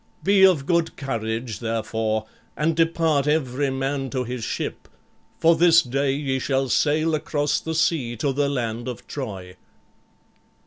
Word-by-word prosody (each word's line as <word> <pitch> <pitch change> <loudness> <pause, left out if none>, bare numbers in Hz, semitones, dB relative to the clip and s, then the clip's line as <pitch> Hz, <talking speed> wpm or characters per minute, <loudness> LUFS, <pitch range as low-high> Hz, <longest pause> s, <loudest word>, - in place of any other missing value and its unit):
Be 195 0 +4
of 175 -8 +5
good 170 0 0
courage, 115 -4 -3
therefore, 110 -1 -2 0.3
and 155 +1 +1
depart 165 -3 +2
every 140 -2 0
man 135 0 -2
to 130 -1 -2
his 125 -1 -5
ship, - - -4 0.5
for 165 +1 +4
this 165 0 +5
day 135 +2 0
ye 135 -1 -1
shall 135 0 0
sail 155 +5 +2
across 150 -1 0
the 160 0 -4
sea 155 -8 +1
to 135 +4 0
the 140 +1 +1
land 120 -3 -3
of 125 -2 -6
Troy." 95 -9 -7
135 Hz, 145 wpm, -23 LUFS, 120-155 Hz, 0.5 s, of